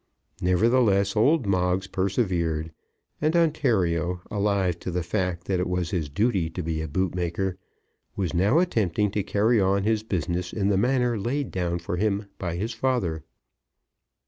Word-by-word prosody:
Nevertheless 100 +1 +3
old 135 +5 +3
Moggs 90 -1 +1
persevered; 90 -5 -1 0.5
and 155 +2 +1
Ontario, 95 - +1
alive 100 -4 0
to - - -5
the 90 0 -1
fact 90 -1 -2
that 95 -1 -1
it 90 - -1
was 90 -2 -1
his 80 -6 -2
duty 95 - +1
to 85 +2 -5
be 80 -1 -2
a 80 - -3
bootmaker, 90 +2 -2 0.6
was 95 -3 -2
now 100 - +3
attempting 105 - +1
to 105 - 0
carry 105 +3 +2
on 95 +1 +2
his 110 0 +1
business 90 -4 -2
in 100 -2 0
the 100 - +3
manner 125 +1 +1
laid 130 +6 -2
down 85 -2 -1
for 85 +1 -4
him 100 +1 0
by 85 -3 -3
his 110 +6 -3
father. 110 -11 -1
95 Hz, 155 wpm, -25 LUFS, 90-110 Hz, 0.6 s, Nevertheless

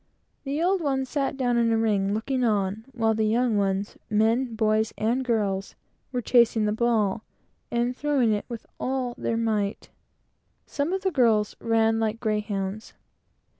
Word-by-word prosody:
The 285 +4 -1
old 375 +1 +2
ones 270 -3 0
sat 275 -2 -1
down 245 -3 +1
in 230 -1 +2
a 225 - +2
ring, 205 -3 +1
looking 255 +4 -1
on, 210 -1 0
while 225 -3 +1
the 220 0 0
young 235 +1 +2
ones 200 0 -1
men, 225 +3 +1
boys 220 0 +1
and 235 +5 0
girls 205 -5 -1 0.4
were 250 -2 -2
chasing 235 -3 +4
the 210 - +1
ball, 220 -2 +1 0.5
and 240 +1 0
throwing 270 -6 +1
it 205 - -2
with 235 -2 -7
all 255 -2 -2
their 230 - -2
might. 215 -3 -1 0.7
Some 290 +3 -2
of 385 0 -1
the 380 - +1
girls 225 -7 +2
ran 225 -1 +2
like 220 0 -1
greyhounds. 210 -2 -3
225 Hz, 160 wpm, -25 LUFS, 215-250 Hz, 0.7 s, chasing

